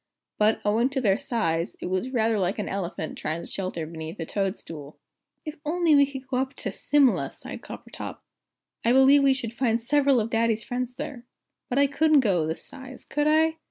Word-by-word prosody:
But, 215 +1 +3
owing 225 +5 +2
to 275 -1 -2
their 205 -4 +2
size, 180 -11 -1
it - - -6
was 185 +7 -1
rather 225 -4 +1
like 185 +1 0
an 210 - -3
elephant 175 -5 -4
trying 160 +2 -3
to - - -8
shelter 185 -4 -4
beneath 160 +1 -8
a 165 - -3
toad 195 +3 -1
stool. 150 -2 -9 0.5
"If 305 - -4
we 315 - -24
could - - -47
only 295 -5 +2
go 260 -1 -1
up 265 +1 -2
to - - -4
Simla," 285 -4 +2
sighed - - -9
Coppertop, - - -8 0.7
"I 235 - +3
believe 265 +2 +6
we 275 -1 +4
should 235 -3 -5
find 235 -2 +1
several 275 +1 +3
of 225 +1 -2
Daddy's 225 -1 +1
friends 250 0 -4
there. 245 -3 -7 0.4
But 250 - -1
I 280 - +6
couldn't 295 +1 +4
go 180 -9 +1
this 160 - -4
size, 265 -2 -11
could 295 +1 0
I? 320 +1 +3
240 Hz, 200 wpm, -26 LUFS, 195-275 Hz, 0.7 s, believe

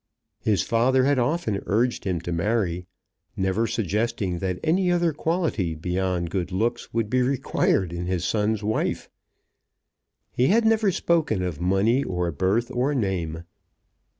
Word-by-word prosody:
His 105 -3 +1
father 130 +3 +2
had 140 0 +3
often 120 - 0
urged 115 +6 +1
him 90 -4 -1
to 85 - -5
marry, 90 -1 -1 0.5
never 95 +4 +1
suggesting 105 -3 -1
that 90 -1 -2
any 180 +3 +2
other 170 -2 +2
quality 150 - -1
beyond 90 +1 -2
good 95 -2 -2
looks 115 +6 -1
would 115 -2 0
be 125 +4 +1
required 125 -8 +1
in 85 0 -4
his 90 -2 -1
son's 105 +1 0
wife. 110 +1 -1 1.2
He 125 - +2
had 225 +4 +3
never 220 -2 +3
spoken 160 - +1
of 90 -3 -4
money, 100 +9 +2
or 90 -2 -2
birth, 95 +10 0
or 130 +4 0
name. 85 -8 -2
105 Hz, 145 wpm, -24 LUFS, 90-130 Hz, 1.2 s, had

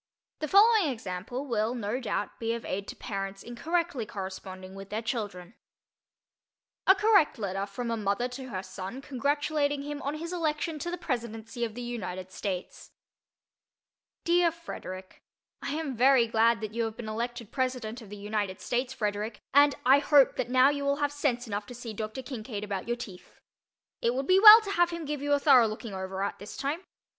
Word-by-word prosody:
The 310 - -2
following 410 -1 +6
example 225 +4 -5
will 230 -2 0
no 230 +1 -2
doubt 210 -4 -3
be 230 0 -1
of 235 - -7
aid 195 +1 -3
to - - -7
parents 195 -2 -5
in 240 - -8
correctly 335 -2 -1
corresponding 190 -2 -7
with 195 0 -9
their 215 +2 -3
children: 205 -5 -4 1.3
A 380 - +8
Correct 410 -6 +4
Letter 195 -2 -3
from 230 +4 -4
a 230 - -1
Mother 205 +3 0
to 260 +1 -8
Her 190 -4 -4
Son 195 +9 -7
Congratulating 285 +1 0
Him 290 0 -5
on 285 +2 -2
His 335 +3 -5
Election 315 -2 -1
to 345 - -3
the 355 - -3
Presidency 235 -5 -4
of 225 -2 -3
the 245 - -5
United 185 -6 -5
States 185 -1 -5 1.3
DEAR 345 0 +4
FREDERICK: 190 - -9 0.4
I - - -3
am 310 -5 -3
very 255 0 +5
glad 230 0 +3
that 215 -1 -5
you 230 0 0
have 225 -1 -5
been 230 - -6
elected 235 0 -4
President 255 -3 -2
of 215 - -12
the 205 - -8
United 205 -2 -3
States, 250 +1 -1
Frederick, 210 0 -2
and 285 +1 +6
I 270 +3 +7
hope 285 -2 +5
that 240 - -2
now 260 +2 +5
you 285 -1 -3
will 280 0 +2
have 290 0 0
sense 275 -4 -1
enough 205 -2 -4
to 245 - -9
see 235 -2 -7
Dr. 220 +5 -5
Kincaid 220 -5 -6
about 200 -1 -4
your 240 0 -1
teeth. 190 -7 -10 0.6
It 235 +1 +1
would 270 +1 -1
be 370 +4 +5
well 430 +2 +12
to 405 -2 -5
have 350 -3 +3
him 335 -2 -5
give 295 -1 -3
you 290 0 +1
a 285 - +4
thorough 265 -6 +6
looking 215 0 -6
over 190 0 -4
at 200 - -3
this 205 +3 -9
time. 285 +5 -2
240 Hz, 195 wpm, -29 LUFS, 210-285 Hz, 1.3 s, well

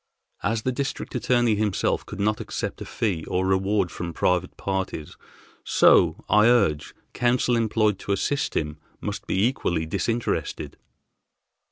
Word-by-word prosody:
As 110 +2 -1
the 130 - +1
District 135 +2 -4
Attorney 120 -2 +2
himself 105 -2 0
could 105 - -8
not 105 +1 +1
accept - - -4
a - - -5
fee 95 -8 -2
or 95 +1 -1
reward 95 -1 +1
from 85 -1 -5
private 90 -1 0
parties, 95 -5 -3 0.5
so, - - +4
I 105 +2 +5
urge, 80 -12 +2 0.2
counsel 120 0 +2
employed 110 -3 +1
to - - -4
assist 140 +9 -1
him 75 0 -3 0.2
must - - -5
be 95 +3 +2
equally 85 -10 0
disinterested." 115 +8 -2
105 Hz, 140 wpm, -25 LUFS, 90-120 Hz, 0.5 s, I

